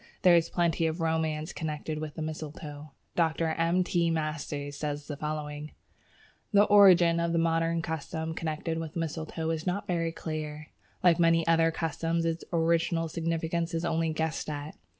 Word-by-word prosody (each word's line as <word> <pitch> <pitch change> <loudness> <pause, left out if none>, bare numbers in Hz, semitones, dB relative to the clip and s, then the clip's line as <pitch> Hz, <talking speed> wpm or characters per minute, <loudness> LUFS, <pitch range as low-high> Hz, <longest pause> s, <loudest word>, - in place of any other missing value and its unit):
There 180 -2 +7
is 170 -1 +3
plenty 170 -2 +1
of 160 +2 -3
romance 160 -1 -1
connected 155 -1 -4
with 155 -1 -6
the 160 - -4
mistletoe. 150 -1 -7 0.3
Dr. 165 -1 +1
M. 165 +3 +2
T. 170 -1 +1
Masters 150 -3 -3
says 145 0 -4
as 145 - -5
follows: 150 -1 -4 0.8
"The 205 -1 +6
origin 185 -5 +6
of 170 0 0
the - - +2
modern 165 0 +1
custom 160 0 -3
connected 160 0 -3
with 160 -1 -6
mistletoe 160 0 -3
is 160 +2 -3
not 200 +4 -1
very 170 -3 0
clear. 155 -2 -5 0.3
Like 175 -2 +5
many 165 -1 +4
other 165 0 +4
customs, 165 +1 -1
its 165 0 -1
original 165 0 +1
significance 165 +1 -1
is 165 +1 -1
only 165 -1 +1
guessed 160 0 -2
at. 145 +1 -5
165 Hz, 160 wpm, -29 LUFS, 155-170 Hz, 0.8 s, There